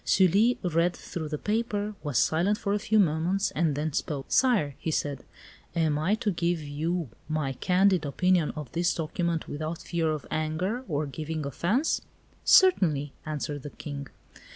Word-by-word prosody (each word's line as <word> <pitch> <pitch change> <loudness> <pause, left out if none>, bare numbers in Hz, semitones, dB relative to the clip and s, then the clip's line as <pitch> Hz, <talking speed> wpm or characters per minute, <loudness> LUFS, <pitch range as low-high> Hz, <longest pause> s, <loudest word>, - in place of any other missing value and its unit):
Sully 200 +6 +4
read 175 0 +1
through 160 -3 -6
the 150 - -2
paper, 210 +1 -1
was 145 -5 -2
silent 175 +10 +2
for 200 -1 -1
a 210 - +1
few 215 +1 +1
moments, 180 +2 +2
and 155 -3 +1
then 150 +1 -2
spoke. 140 -2 -2
"Sire," 220 - +3
he 160 - -3
said, 145 -3 -2 0.5
"am 155 -3 +1
I 185 +7 +2
to 220 -2 -1
give 170 -1 0
you 155 +2 -2 0.2
my 155 -3 -1
candid 185 +4 +3
opinion 175 +3 +2
on 150 -3 -5
this 175 +3 +1
document, 165 +1 -2
without 155 +3 -4
fear 165 -2 0
of 155 -2 -3
anger 170 +10 -1
or 150 -2 -1
giving 155 +2 -4
offence?" 200 - 0 0.4
"Certainly," 155 - +5
answered 145 -1 -3
the 145 - -7
King. 140 -1 -7
165 Hz, 160 wpm, -28 LUFS, 150-190 Hz, 0.5 s, Certainly